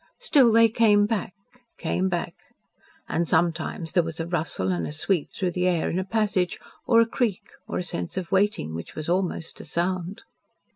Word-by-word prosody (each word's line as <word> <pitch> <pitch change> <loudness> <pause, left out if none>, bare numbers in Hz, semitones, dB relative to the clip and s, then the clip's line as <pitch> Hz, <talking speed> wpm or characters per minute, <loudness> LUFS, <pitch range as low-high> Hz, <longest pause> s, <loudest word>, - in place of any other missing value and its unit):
Still 285 - +4
they 230 +1 +6
came 215 -2 +4
back 205 -3 -2 0.4
came 185 +3 0
back. 175 -1 -2 0.7
And 170 0 0
sometimes 165 0 0
there 180 - +4
was 165 0 -6
a 165 - -1
rustle 160 - -1
and 85 -2 -1
a - - -5
sweep 160 +2 -1
through 185 -2 -2
the 180 +1 0
air 175 -3 +1
in 180 - -1
a - - -1
passage, 195 -3 0 0.3
or 230 -1 +6
a - - +4
creak, 230 -4 -1 0.2
or - - -3
a - - -1
sense 90 - -5
of 180 -2 -4
waiting 195 - +1
which 85 +1 -7
was 155 - -5
almost 175 -2 -2
a - - -11
sound. 175 +3 -2
180 Hz, 190 wpm, -25 LUFS, 165-205 Hz, 0.7 s, they